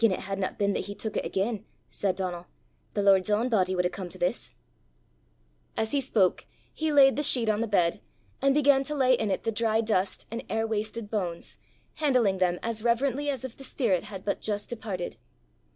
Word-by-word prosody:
"Gien 225 -3 +5
it 185 - -2
hadna 195 0 -3
been 200 -1 +1
that - - -2
he 205 - -7
tuik 220 0 -4
it - - 0
again," 200 +2 -1 0.2
said 195 -2 -1
Donal, 180 -2 -4 0.5
"the 205 - +1
Lord's 195 -1 +4
ain 220 +4 +2
body 185 -5 +2
wad 180 0 +1
hae - - +2
come 185 -1 -6
to - - -9
this." 175 - -2 1.2
As 220 0 0
he 285 - +2
spoke 210 -8 +1 0.3
he 315 -1 -1
laid 275 -2 +6
the - - +1
sheet 250 -5 +4
on 215 0 +1
the 230 - 0
bed, 175 -5 +1 0.4
and 275 0 +3
began 285 -2 +5
to 300 - -3
lay 260 -2 +4
in 220 -4 +1
it 190 - -1
the 225 - 0
dry 220 0 +1
dust 200 -4 0
and 230 - -4
air 225 0 0
wasted 220 0 -3
bones, 180 -6 -3 0.4
handling 250 -11 +2
them 180 -1 +2
as 225 -1 -2
reverently 265 +4 +1
as 265 -3 -2
if 250 - -8
the 270 - -12
spirit 215 - 0
had 195 -3 -8
but 200 - -1
just 205 -1 -2
departed. 205 -7 -5
215 Hz, 210 wpm, -27 LUFS, 190-245 Hz, 1.2 s, laid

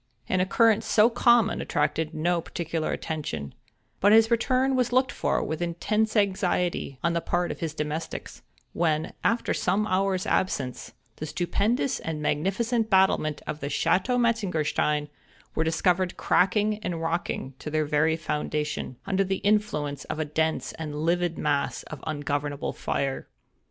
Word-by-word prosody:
An 185 - +1
occurrence 220 +4 +3
so 220 +2 +5
common 235 -2 +4
attracted 150 +1 0
no 170 +2 0
particular 165 -1 -3
attention, 80 - -4 0.5
but 205 - +5
his 225 +1 +6
return 255 +3 +2
was 250 -2 +1
looked 255 +1 +3
for - - 0
with 160 +2 -3
intense 210 +6 0
anxiety 185 -7 0
on 170 0 +2
the 170 - 0
part 175 +1 0
of - - -7
his 160 -2 -3
domestics, 150 +2 -5 0.3
when, 160 -2 0
after 230 +1 +1
some 195 +4 +1
hours' 190 -1 0
absence, 135 -9 -1 0.2
the 155 - -5
stupendous 210 - 0
and 160 -2 -4
magnificent 215 +10 0
battlements 190 -6 +3
of 150 - -4
the 140 - -4
Chateau 185 - +1
Metzengerstein, 170 -10 +1 0.5
were 160 - +1
discovered 175 +3 +1
crackling 210 +3 +2
and 175 -5 -3
rocking 165 -4 -2
to - - -6
their 155 0 0
very 150 +2 +2
foundation, 150 -3 -3
under 195 0 +1
the 190 0 -1
influence 200 -9 0
of - - -4
a 155 - -1
dense 160 +2 -1
and 150 -2 -4
livid 175 0 +1
mass 145 -2 -1
of 150 -4 -9
ungovernable 145 -1 -2
fire. 135 -1 -2
170 Hz, 145 wpm, -26 LUFS, 155-210 Hz, 0.5 s, his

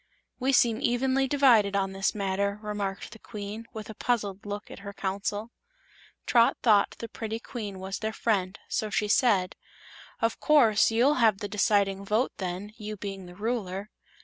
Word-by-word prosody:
"We 265 +1 +1
seem 235 -3 +3
evenly 260 +2 +1
divided 245 -8 +4
on 195 -1 0
this 195 +2 -1
matter," 200 0 -1
remarked 205 -2 -4
the 220 - -12
Queen, 210 +2 -7
with 215 -1 -7
a 220 - -7
puzzled 205 -3 -2
look 205 0 -6
at - - -9
her 200 0 -8
Council. 205 +3 -3 0.7
Trot 235 -1 +4
thought 210 -4 +4
the 230 - -6
pretty 225 -1 -5
Queen 210 -5 -6
was 190 +1 -5
their 220 0 -2
friend, 200 -4 -1
so 215 - -2
she 210 0 0
said: 205 -5 +3 0.6
"Of 230 -1 0
course 230 -9 +5
you'll 250 +5 +3
have 220 -4 +5
the 205 - -4
deciding 200 -1 +1
vote, 215 +6 +1
then, 190 +3 -5
you 215 -1 -6
being 195 -2 -6
the 180 - -12
Ruler." 205 -2 -3
210 Hz, 170 wpm, -28 LUFS, 195-230 Hz, 0.7 s, course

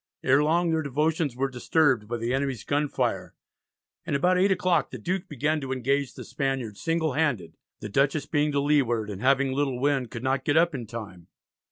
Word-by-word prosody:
Ere 135 +3 +4
long 170 +2 +2
their 160 0 +1
devotions 150 0 0
were 135 +2 0
disturbed 130 -2 +1
by 120 +2 -3
the 115 +2 -2
enemy's 135 -4 -2
gunfire, 145 0 -1 0.7
and - - -2
about 180 +6 +3
eight 190 +2 +3
o'clock 180 -1 +1
the - - -7
Duke 190 +1 -3
began 150 +2 -1
to 135 -1 -5
engage 135 +1 -1
the - - -8
Spaniard 135 -6 -3
single 165 +2 -1
handed; 130 - -1 0.3
the 105 - -5
Dutchess 140 +6 +1
"being 150 0 +1
to 140 - +1
leeward, 125 -7 +1
and 100 0 -7
having 135 +1 +3
little 135 -2 -1
wind, 135 -3 0
could 115 - -7
not 130 0 0
get 145 +2 +1
up 170 0 +4
in 120 -5 -5
time." 105 -7 -8
140 Hz, 195 wpm, -26 LUFS, 125-155 Hz, 0.7 s, Ere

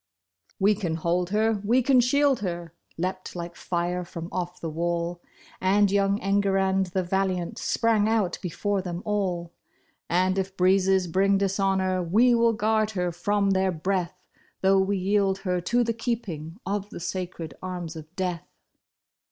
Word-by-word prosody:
We 200 +2 +4
can 185 -6 -2
hold 170 +2 0
her, 215 0 +1
we 240 +5 +3
can 265 0 +5
shield 275 +2 +3
her," 170 -4 -4 0.2
leaped 185 +2 -4
like 170 0 -6
fire 175 0 -2
from 170 -1 -7
off 180 -1 -4
the 165 - -4
wall. 170 +2 -2 0.4
And 200 +1 +3
young 200 0 +2
Enguerrand 195 -1 +2
the 185 +1 -1
valiant, 185 -1 -1
sprang 220 -2 +2
out 215 -6 0
be 180 - -3
fore 200 +4 -1
them 180 -1 -5
all. 180 -5 -1 0.6
"And 185 +2 +2
if 190 0 -4
breezes 190 0 +3
bring 195 +3 +2
dishonor, 195 -1 +1
we 220 +9 +4
will 230 -1 +4
guard 215 0 +1
her 180 -1 0
from 200 +3 +1
their 190 0 +2
breath. 185 +1 -2 0.4
Though 195 0 +4
we 195 +1 +1
yield 195 0 +1
her 180 -1 0
to 240 +7 +2
the 230 0 0
keeping 200 -9 -4
of 200 +1 -2
the - - -8
sacred 175 -4 -5
arms 180 -3 -5
of 155 -1 -8
Death." 180 -3 -3
190 Hz, 160 wpm, -26 LUFS, 175-205 Hz, 0.6 s, can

